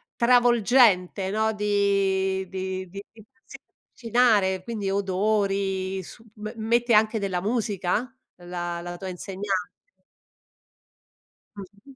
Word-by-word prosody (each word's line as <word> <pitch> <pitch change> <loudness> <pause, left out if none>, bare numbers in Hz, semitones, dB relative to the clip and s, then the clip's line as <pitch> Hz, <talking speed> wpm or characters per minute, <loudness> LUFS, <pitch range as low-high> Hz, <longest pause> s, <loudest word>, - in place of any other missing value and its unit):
travolgente, 235 -6 +3
no, 220 +1 +1
di 195 -2 0
di 190 0 -4
di 200 +1 -8
di 220 -2 -17 0.2
sì, 275 - -12
avvicinare, 225 -8 0
quindi 205 -3 -3
odori, 195 -1 -1
su 225 - -13
m 215 0 -6
mette 235 +2 +1
anche 220 +1 +4
della 190 -3 -2
musica 215 +2 -1 0.2
la 175 -1 -5
la 175 0 -7
tua 190 - -7
insegnante? 190 +1 -4 1.8
Mh. 200 +7 -13
200 Hz, 105 wpm, -25 LUFS, 190-220 Hz, 1.8 s, anche